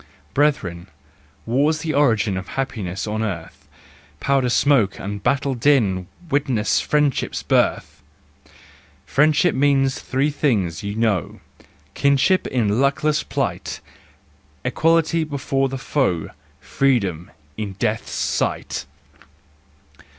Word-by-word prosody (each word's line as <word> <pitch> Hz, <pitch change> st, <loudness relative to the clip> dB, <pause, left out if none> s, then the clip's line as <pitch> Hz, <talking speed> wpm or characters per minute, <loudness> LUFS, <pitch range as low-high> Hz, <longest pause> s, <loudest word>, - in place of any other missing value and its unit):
Brethren, 100 Hz, -, 0 dB, 0.6 s
war's 145 Hz, +6 st, +1 dB
the 155 Hz, -1 st, -2 dB
origin 110 Hz, -8 st, +2 dB
Of 95 Hz, +1 st, -5 dB
happiness 100 Hz, -8 st, -3 dB
on 110 Hz, 0 st, -2 dB
earth: 95 Hz, -7 st, -5 dB, 0.5 s
Powder 135 Hz, -2 st, +1 dB
smoke 120 Hz, -5 st, +2 dB
and 100 Hz, +1 st, -5 dB
battle 140 Hz, +4 st, +1 dB
din 115 Hz, -9 st, +2 dB, 0.2 s
Witness 130 Hz, -6 st, +1 dB
friendship's 150 Hz, -3 st, 0 dB
birth! -, -, 0 dB, 1.0 s
Friendship 155 Hz, +3 st, +3 dB
means 135 Hz, -1 st, +2 dB
three 135 Hz, +3 st, 0 dB
things, 100 Hz, -, 0 dB
you 100 Hz, 0 st, -4 dB
know,— 110 Hz, -7 st, 0 dB, 0.5 s
Kinship 140 Hz, +7 st, +2 dB
in 115 Hz, -2 st, +1 dB
luckless 150 Hz, +2 st, +1 dB
plight, -, -, -3 dB, 0.9 s
Equality 165 Hz, 0 st, +2 dB
before 135 Hz, -2 st, -1 dB
the 135 Hz, -, -4 dB
foe 125 Hz, -, -1 dB, 0.3 s
Freedom—in 95 Hz, -, -2 dB
death's 105 Hz, +3 st, -2 dB
sight! -, -, -2 dB
130 Hz, 100 wpm, -21 LUFS, 100-145 Hz, 1.0 s, Friendship